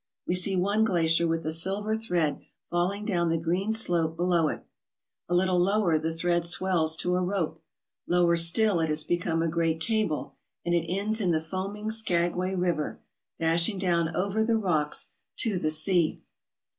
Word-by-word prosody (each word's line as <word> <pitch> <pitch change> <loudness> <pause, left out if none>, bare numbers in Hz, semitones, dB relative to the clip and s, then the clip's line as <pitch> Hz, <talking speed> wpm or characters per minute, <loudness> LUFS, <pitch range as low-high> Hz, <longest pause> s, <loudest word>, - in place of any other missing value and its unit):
We - - -1
see 180 +2 +1
one 200 +4 +1
glacier 170 -5 +2
with 165 0 -2
a 155 - -1
silver 195 +6 0
thread 175 -9 -1 0.3
falling 185 +4 -1
down 175 -5 0
the 165 - +1
green 175 +6 -1
slope 170 -7 +1
below 175 -2 +2
it. - - -5 0.6
A 175 - +1
little 180 0 +2
lower 185 -3 +2
the 160 +1 -2
thread 170 +1 0
swells 170 -2 +1
to 180 +2 0
a 180 - +1
rope. 180 -3 -2 0.5
Lower 175 -1 +3
still 170 +3 +3
it 160 -1 0
has 150 0 +3
become 165 0 -1
a - - 0
great 165 0 0
cable, 215 -4 -1 0.3
and 175 - 0
it 170 -1 0
ends 210 +4 0
in 185 - +1
the 160 -2 +2
foaming 195 +6 -5
Skag 175 -6 0
way 185 +2 -2
River, 175 -4 -2 0.4
dashing 170 +5 +2
down 170 -3 0
over 200 +4 0
the 225 0 +1
rocks 160 -8 +1 0.3
to 215 -7 0
the 155 - 0
sea. 155 +2 +1
175 Hz, 175 wpm, -27 LUFS, 165-195 Hz, 0.6 s, Lower